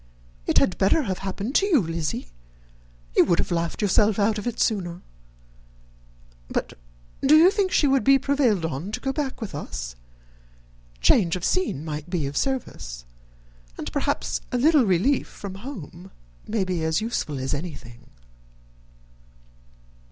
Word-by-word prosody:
It - - +2
had 185 - +2
better 200 +11 +3
have 190 -6 -3
happened 195 +5 -4
to 395 - +3
you, 335 -9 +5
Lizzy; 165 - -3 0.9
you - - +7
would 175 - +2
have - - -1
laughed 170 +4 -1
yourself 205 +1 +3
out 210 +1 +2
of 210 - -5
it 240 -1 -3
sooner. 180 -6 -1 1.4
But - - -3 0.5
do 285 +3 +6
you 345 +4 +7
think 395 -2 0
she - - +3
would 270 -1 +3
be 275 0 +6
prevailed 260 - +1
on 160 +5 -4
to - - -2
go 270 0 -2
back 280 -3 -3
with 220 - -5
us? - - -6 1.1
Change 170 - +4
of 180 - -3
scene 360 - 0
might 150 +1 -5
be 175 -5 -1
of 140 +1 -4
service 100 - -3 0.7
and - - -6
perhaps - - -1
a 250 - +1
little 290 0 +5
relief 200 +9 +2
from 200 -2 -8
home 190 - -9 0.4
may 215 -2 0
be 180 -3 -2
as 160 +2 +1
useful 215 - -2
as 130 +2 -2
anything." 130 -6 -7
195 Hz, 150 wpm, -24 LUFS, 160-265 Hz, 1.4 s, you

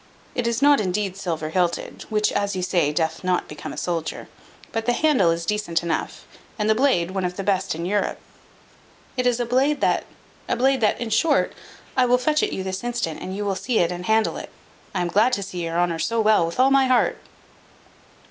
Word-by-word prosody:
It 245 -1 -1
is 235 +3 0
not 285 -4 +6
indeed 195 0 -1
silver 165 -5 -3
hilted, 175 -1 -1
which, 210 -1 +1
as 200 -1 -1
you 185 - -2
say, 175 -5 +1
doth 160 +2 -1
not 180 -1 0
become 150 - -7
a - - -9
soldier; 170 -3 -3 0.4
but 225 0 -3
the 245 - +3
handle 260 - +3
is 165 0 -1
decent 210 -4 -1
enough, 165 -2 -3 0.3
and 210 -1 0
the 220 - +5
blade 220 -8 +2
one 190 -1 -2
of 180 0 -2
the 195 - -3
best 190 -3 0
in 170 +1 -4
Europe. 205 +3 0 1.0
It 250 -1 +1
is 245 -1 +1
a 240 - 0
blade 270 +5 +2
that - - +2 0.4
a - - +2
blade 265 +1 +2
that 215 - +2
in 235 -2 -4
short, 285 +7 +2 0.4
I 255 -1 +4
will 250 +1 +4
fetch 300 +4 +1
it - - 0
you 190 - -3
this 190 +2 -4
instant, 235 -10 -3
and 185 - -5
you 205 - -2
shall 200 -1 0
see 235 +4 -1
it 170 0 +2
and 180 0 -5
handle 220 0 +2
it. - - -7 0.5
I 180 - +1
am 175 - 0
glad 215 +8 +3
to 200 - 0
see 180 -2 -5
your 165 0 -2
honour 175 -2 +1
so 230 +6 0
well 215 -6 +4
with 170 - -6
all 265 +1 +5
my 270 -1 +4
heart." 255 -1 +2
200 Hz, 225 wpm, -23 LUFS, 175-240 Hz, 1.0 s, not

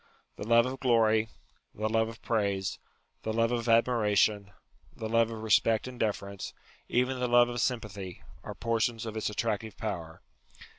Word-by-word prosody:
The 105 - -7
love 115 +1 +5
of 130 +1 -4
glory; 110 -3 +3 0.5
the 110 +1 -1
love 110 0 +1
of 115 - -12
praise; 100 -4 -1 0.4
the 110 - -3
love 115 +1 +1
of 120 -1 -1
admiration; 105 -3 +3 0.4
the 110 - -5
love 115 0 +3
of 110 -1 -7
respect 110 +1 +3
and 125 -1 -9
deference; 100 -2 -3 0.3
even 125 +1 +1
the 125 - 0
love 120 0 +5
of 120 -1 -2
sympathy, 105 -7 -3 0.2
are - - -7
portions 115 0 -1
of 110 -1 -5
its 110 - -1
attractive 110 0 -2
power. 85 -7 -5
110 Hz, 160 wpm, -29 LUFS, 105-115 Hz, 0.5 s, love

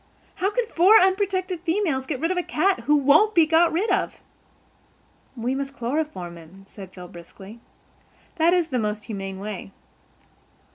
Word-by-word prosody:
How 385 - 0
can - - -1
four 410 +2 +5
unprotected 375 -1 0
females 330 -7 -1
get 280 -5 -3
rid 330 +3 -1
of 370 - -2
a - - +1
cat 370 +3 0
who 300 - +4
won't 295 +10 +4
be 335 -2 +6
got 325 +1 +3
rid 365 +8 0
of?" - - 0 1.2
"We 240 +3 -2
must 275 0 -4
chloroform 235 - -4
him," 175 +4 -16
said 195 -2 -12
Phil 180 -1 -11
briskly. 190 +5 -13 0.8
"That 330 +1 +3
is 350 -2 +1
the 255 -3 -1
most 210 -1 -3
humane 195 -3 -6
way." 200 -1 -7
300 Hz, 160 wpm, -23 LUFS, -, 1.2 s, be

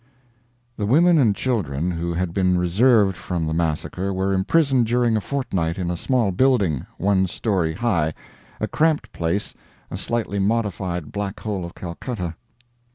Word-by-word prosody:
The 105 - -1
women 165 +7 +5
and 110 -7 +3
children 90 - -1
who 85 0 -3
had 85 0 -2
been 90 -1 +2
reserved 100 +3 +3
from 85 -1 -3
the 80 - -2
massacre 85 +4 -1
were 95 +1 0
imprisoned 130 +5 +2
during 120 -1 +2
a 110 - +1
fortnight 95 -12 -2
in 90 -2 -2
a - - -2
small 120 +2 +1
building, 100 - +2
one 95 0 +2
story 90 -4 -1
high 90 -9 0 0.4
a - - -1
cramped 150 -8 +1
place, 85 +4 -2 0.4
a - - -4
slightly 110 -4 -2
modified 95 -6 -1
Black 100 -1 -4
Hole 100 -4 -3
of 85 - -8
Calcutta. 90 0 -5
95 Hz, 155 wpm, -22 LUFS, 85-115 Hz, 0.4 s, women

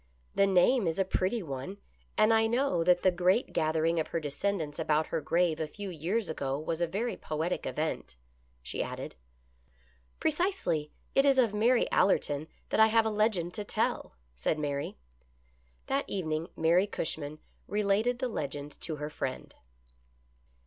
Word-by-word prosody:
" 60 - -36
The 200 - +6
name 195 +4 +4
is 165 - -1
a 195 - +2
pretty 190 +4 0
one, 140 +6 -5 0.4
and 215 +1 +5
I 225 0 +4
know 235 -7 +1
that 180 +1 +4
the 185 - +5
great 180 +7 +2
gathering 160 +1 +1
of 160 - -1
her 165 - -2
descendants 155 +1 -2
about 155 -1 +2
her 165 - -2
grave 165 +1 +1
a 160 - -1
few 200 +5 -7
years 180 +6 -1
ago 135 -3 -2
was 160 +2 -3
a 170 - +2
very 215 +8 -2
poetic 160 +3 -3
event," 155 - -3 0.5
she - - -3
added. - - -5 0.6
" 60 0 -35
Precisely. 300 - 0 0.2
It 275 - +5
is 275 -1 +4
of 235 -5 +4
Mary 235 +4 +3
Allerton 155 -5 +2 0.2
that - - 0
I 220 - +8
have 225 0 +3
a 220 - +1
legend 210 -5 +1
to 210 - -4
tell," 200 - -1 0.2
said 110 - 0
Mary. 145 - -3 0.9
That 275 +1 -1
evening 160 -4 -2
Mary 170 +5 +4
Cushman 155 -5 -4 0.3
related 210 +4 +1
the 255 0 -1
legend 145 - -5
to 160 - -1
her 150 +1 -5
friend. 130 -4 -4
175 Hz, 165 wpm, -30 LUFS, 155-210 Hz, 0.9 s, I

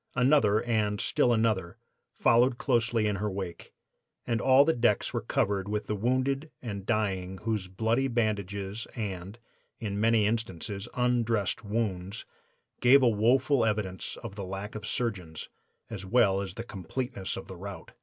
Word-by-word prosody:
Another, 125 -5 +4
and 105 -3 0
still 120 - +2
another, 110 -6 +1 0.4
followed 120 +1 +4
closely 115 -4 +1
in 105 -1 0
her 105 +2 -1
wake, 95 -3 -6 0.5
and 115 -1 0
all 135 +2 +6
the 160 - +3
decks 120 -5 +1
were - - -1
covered 100 0 0
with 105 0 -2
the 105 - -2
wounded 130 +7 0
and 100 -5 -6
dying 95 -5 -1
whose 110 -4 -1
bloody 115 +7 0
bandages 100 -3 -2
and, 100 -2 -5 0.4
in 100 -3 -3
many 115 -1 +4
instances, 105 -2 -2
undressed 120 -4 +1
wounds 100 -2 -3 0.5
gave 130 +2 +6
woeful 125 +4 +3
evidence 105 -5 -2
of - - -6
the 100 -1 -6
lack 95 +3 -5
of 105 -1 -6
surgeons, 95 -10 -3 0.4
as 105 -4 -6
well 100 -1 +3
as 100 - -6
the 115 - -5
completeness 110 +1 -4
of 95 - -7
the 95 - -8
rout. 100 +2 -8
110 Hz, 150 wpm, -29 LUFS, 100-120 Hz, 0.5 s, all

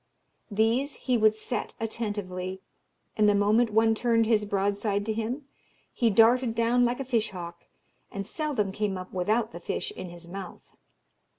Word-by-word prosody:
These 230 +7 +1
he 255 - -1
would 215 -2 +4
'set' 220 +3 -3
attentively, 200 -5 -4 0.6
and 210 -1 +4
the 205 - +4
moment 215 +4 +3
one 225 +1 +4
turned 230 0 +2
his 215 -2 +2
broadside 200 +1 0
to 220 - -1
him, 235 +6 -3 0.5
he 235 - +2
darted 230 +3 +4
down 235 +2 +3
like 245 +2 -1
a 270 - -3
fish 230 -4 0
hawk, 170 -2 -8 0.5
and 200 0 -4
seldom 260 - -2
came 205 -1 -2
up 185 0 -8
without 215 +5 0
the - - -8
fish 435 - -3
in 185 - -7
his 170 0 -11
mouth. 190 0 -9
220 Hz, 165 wpm, -27 LUFS, 200-235 Hz, 0.6 s, would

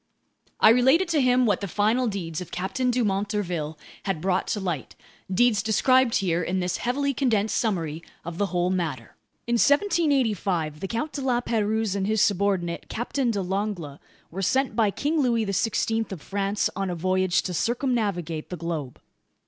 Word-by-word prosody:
I - - +7
related 265 +10 +4
to 315 -4 +2
him 250 0 +4
what 205 -4 +1
the 200 - -3
final 220 +7 +1
deeds 180 -6 -4
of 180 - -8
Captain 195 +9 -2
Dumont 205 -5 0
d'Urville 175 -7 -3 0.3
had 195 -5 -1
brought 185 +2 0
to 210 - -1
light, 175 -8 -4 0.4
deeds 215 +1 +3
described 250 +3 +3
here 175 -3 +1
in 180 +2 -1
this 180 0 -1
heavily 280 +3 0
condensed 220 -5 +1
summary 165 -8 -1 0.2
of 170 0 -6
the 205 - +2
whole 180 0 0
matter. 155 - -3 0.3
In 235 - -1
1785 245 - +2
the 195 - -4
Count 235 +9 -3
de 285 - -5
La 255 -2 +1
Pérouse 220 -3 0
and 195 -1 -1
his 220 0 +1
subordinate, 190 -4 +1
Captain 245 +2 -1
de 205 -4 -1
Langle, 185 -6 -3 0.3
were 190 +4 -4
sent 265 +8 +1
by 225 -3 +3
King 295 +9 0
Louis 235 -4 +1
XVI 225 +2 0
of 190 - -5
France 200 +4 -1
on 195 -1 -2
a 175 - -2
voyage 185 +1 +1
to 180 - -4
circumnavigate 205 - -1
the 180 - -5
globe. 160 -6 -4
200 Hz, 175 wpm, -25 LUFS, 180-240 Hz, 0.4 s, I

